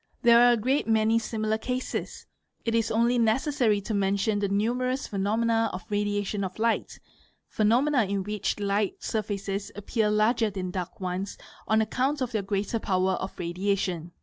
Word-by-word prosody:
There 235 Hz, -1 st, +7 dB
are 245 Hz, 0 st, +7 dB
a -, -, +1 dB
great 260 Hz, +6 st, 0 dB
many 220 Hz, 0 st, +3 dB
similar 220 Hz, -1 st, -2 dB
cases: 255 Hz, +2 st, -4 dB, 0.4 s
it 230 Hz, -, 0 dB
is 225 Hz, -1 st, +1 dB
only 235 Hz, +2 st, +2 dB
necessary 235 Hz, -1 st, +2 dB
to 215 Hz, -, -4 dB
mention 200 Hz, +1 st, +1 dB
the 200 Hz, -1 st, 0 dB
numerous 250 Hz, +6 st, 0 dB
phenomena 225 Hz, +3 st, +1 dB
of 185 Hz, -, -6 dB
radiation 205 Hz, 0 st, -1 dB
of 185 Hz, -1 st, -5 dB
light, 230 Hz, +1 st, 0 dB, 0.5 s
phenomena, 245 Hz, +4 st, +2 dB
in 195 Hz, 0 st, -2 dB
which 210 Hz, +1 st, -2 dB
light 200 Hz, 0 st, -1 dB
surfaces 200 Hz, -2 st, -3 dB
appear 210 Hz, +2 st, 0 dB
larger 220 Hz, +2 st, +2 dB
than 185 Hz, -2 st, -4 dB
dark 180 Hz, -1 st, -5 dB
ones 185 Hz, +1 st, -3 dB, 0.3 s
on 220 Hz, 0 st, +3 dB
account 260 Hz, +7 st, 0 dB
of 255 Hz, -2 st, -2 dB
their 220 Hz, -3 st, 0 dB
greater 200 Hz, +3 st, -2 dB
power 185 Hz, -2 st, +1 dB
of 190 Hz, +1 st, -4 dB
radiation. 175 Hz, -1 st, -2 dB
215 Hz, 160 wpm, -27 LUFS, 200-230 Hz, 0.5 s, There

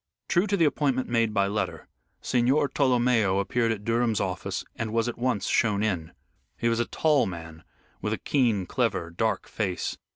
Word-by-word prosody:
True 180 Hz, +4 st, +2 dB
to 200 Hz, 0 st, +1 dB
the 165 Hz, -, +4 dB
appointment 140 Hz, -3 st, 0 dB
made 115 Hz, -2 st, +2 dB
by 100 Hz, -2 st, +2 dB
letter, 105 Hz, +2 st, -3 dB, 0.4 s
Signor 130 Hz, +4 st, +2 dB
Tolomeo 125 Hz, -7 st, +2 dB
appeared 115 Hz, +3 st, +1 dB
at 105 Hz, -2 st, -4 dB
Durham's 115 Hz, -2 st, +1 dB
office 95 Hz, -2 st, -3 dB
and 110 Hz, -1 st, -3 dB
was 115 Hz, +1 st, +1 dB
at 120 Hz, -, -3 dB
once 120 Hz, -6 st, 0 dB
shown 105 Hz, -3 st, +2 dB
in. 90 Hz, -7 st, -1 dB, 0.5 s
He 115 Hz, -, +1 dB
was 115 Hz, 0 st, 0 dB
a 120 Hz, -, +2 dB
tall 150 Hz, -7 st, +2 dB
man 80 Hz, -2 st, -8 dB, 0.4 s
with -, -, -2 dB
a -, -, 0 dB
keen, 115 Hz, -9 st, +1 dB
clever, 85 Hz, 0 st, -1 dB
dark 110 Hz, +6 st, -1 dB
face. 95 Hz, -5 st, -3 dB
115 Hz, 175 wpm, -26 LUFS, 100-125 Hz, 0.5 s, the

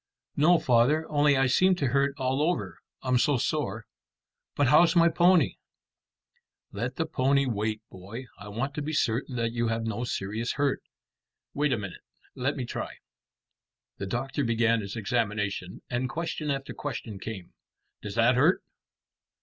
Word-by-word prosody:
"No, 165 Hz, +5 st, +5 dB
father, 135 Hz, +5 st, +3 dB
only 145 Hz, -1 st, +4 dB
I 135 Hz, -, +3 dB
seem 185 Hz, +8 st, +4 dB
to 140 Hz, -7 st, 0 dB
hurt 140 Hz, +2 st, +1 dB
all 130 Hz, +1 st, 0 dB
over, 105 Hz, -, -1 dB, 0.2 s
I'm 130 Hz, -1 st, +2 dB
so 145 Hz, +1 st, +3 dB
sore. 115 Hz, -6 st, -2 dB, 0.7 s
But 145 Hz, -3 st, +3 dB
how's 165 Hz, +5 st, +6 dB
my 170 Hz, 0 st, +6 dB
pony?" 175 Hz, -2 st, +4 dB, 1.1 s
"Let 120 Hz, +6 st, -3 dB
the 160 Hz, -, -1 dB
pony 140 Hz, -2 st, +2 dB
wait, 110 Hz, -2 st, -2 dB
boy. 100 Hz, +8 st, -8 dB
I 105 Hz, -, -9 dB
want 120 Hz, +7 st, -3 dB
to 150 Hz, -, -4 dB
be 155 Hz, +2 st, -3 dB
certain 125 Hz, -1 st, 0 dB
that 115 Hz, -1 st, 0 dB
you 120 Hz, 0 st, -1 dB
have 115 Hz, 0 st, -1 dB
no 115 Hz, +1 st, -2 dB
serious 110 Hz, 0 st, -2 dB
hurt. 140 Hz, -1 st, 0 dB, 0.7 s
Wait 145 Hz, 0 st, +1 dB
a 125 Hz, -, +2 dB
minute. 100 Hz, -4 st, -7 dB, 0.3 s
Let 130 Hz, +3 st, -1 dB
me 130 Hz, -, -2 dB
try." -, -, -5 dB, 1.0 s
The 100 Hz, -, -3 dB
doctor 135 Hz, +7 st, -2 dB
began 115 Hz, -1 st, +2 dB
his 100 Hz, -1 st, -6 dB
examination, 105 Hz, -5 st, -2 dB
and 125 Hz, +1 st, -2 dB
question 160 Hz, 0 st, -3 dB
after 135 Hz, -1 st, -3 dB
question 115 Hz, -7 st, -5 dB
came. 95 Hz, -4 st, -7 dB, 0.5 s
"Does 105 Hz, 0 st, -6 dB
that 115 Hz, +2 st, +4 dB
hurt? 145 Hz, +9 st, +3 dB
125 Hz, 160 wpm, -28 LUFS, 110-145 Hz, 1.1 s, how's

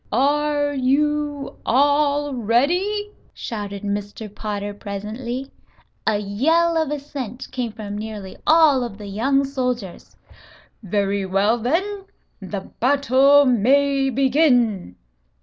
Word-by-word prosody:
"Are 290 Hz, +3 st, +1 dB
you 290 Hz, +1 st, 0 dB
all 285 Hz, +2 st, +2 dB
ready?" 350 Hz, -, 0 dB, 0.2 s
shouted 205 Hz, -3 st, -6 dB
Mr. 205 Hz, +1 st, -5 dB
Potter 205 Hz, -1 st, -4 dB
presently. 220 Hz, +6 st, -6 dB, 0.6 s
A 220 Hz, -2 st, +3 dB
yell 315 Hz, +12 st, +1 dB
of 320 Hz, -3 st, +1 dB
assent 275 Hz, -4 st, -6 dB
came 245 Hz, -3 st, -3 dB
from 210 Hz, -1 st, -6 dB
nearly 210 Hz, -3 st, -7 dB
all 310 Hz, -5 st, +5 dB
of 230 Hz, -5 st, -6 dB
the 210 Hz, -, -9 dB
young 265 Hz, +8 st, +1 dB
soldiers. 250 Hz, -8 st, -4 dB, 0.7 s
"Very 200 Hz, -1 st, -1 dB
well, 200 Hz, +5 st, +2 dB
then; 385 Hz, -, -1 dB, 0.4 s
the 195 Hz, +1 st, -5 dB, 0.2 s
battle 280 Hz, +2 st, +4 dB
may 270 Hz, +3 st, +3 dB
begin." 250 Hz, -, +2 dB
255 Hz, 105 wpm, -21 LUFS, 210-285 Hz, 0.7 s, all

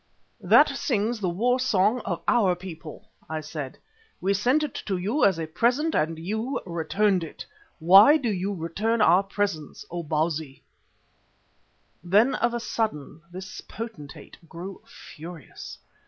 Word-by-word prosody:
"That -, -, +6 dB
sings 230 Hz, -2 st, -1 dB
the 190 Hz, -3 st, -1 dB
war 245 Hz, +9 st, +1 dB
song 220 Hz, -1 st, +2 dB
of 175 Hz, -3 st, -3 dB
our 200 Hz, -7 st, +3 dB
people," 170 Hz, -4 st, -10 dB, 0.2 s
I 155 Hz, 0 st, -3 dB
said. 150 Hz, -3 st, -7 dB, 0.4 s
"We 195 Hz, +2 st, +1 dB
sent 250 Hz, +10 st, +2 dB
it 295 Hz, -, -3 dB
to 195 Hz, -2 st, 0 dB
you 210 Hz, +12 st, 0 dB
as 190 Hz, -4 st, +4 dB
a 165 Hz, -, -3 dB
present 245 Hz, -, +1 dB
and 160 Hz, +1 st, 0 dB
you 220 Hz, -, -3 dB
returned 185 Hz, +2 st, 0 dB
it. 160 Hz, -, -8 dB, 0.3 s
Why 195 Hz, -, +7 dB
do 245 Hz, -7 st, -1 dB
you 195 Hz, +1 st, -2 dB
return 200 Hz, +6 st, -1 dB
our 180 Hz, -2 st, +6 dB
presents, 195 Hz, -5 st, -3 dB
O 175 Hz, 0 st, -3 dB
Bausi?" 155 Hz, -2 st, -2 dB, 1.4 s
Then 210 Hz, +9 st, +4 dB
of 235 Hz, +1 st, 0 dB
a -, -, -1 dB
sudden 215 Hz, -10 st, -3 dB
this 185 Hz, +1 st, -8 dB
potentate 200 Hz, -11 st, -9 dB
grew 185 Hz, +3 st, -8 dB
furious. 165 Hz, 0 st, -11 dB
190 Hz, 140 wpm, -25 LUFS, 165-225 Hz, 1.4 s, Why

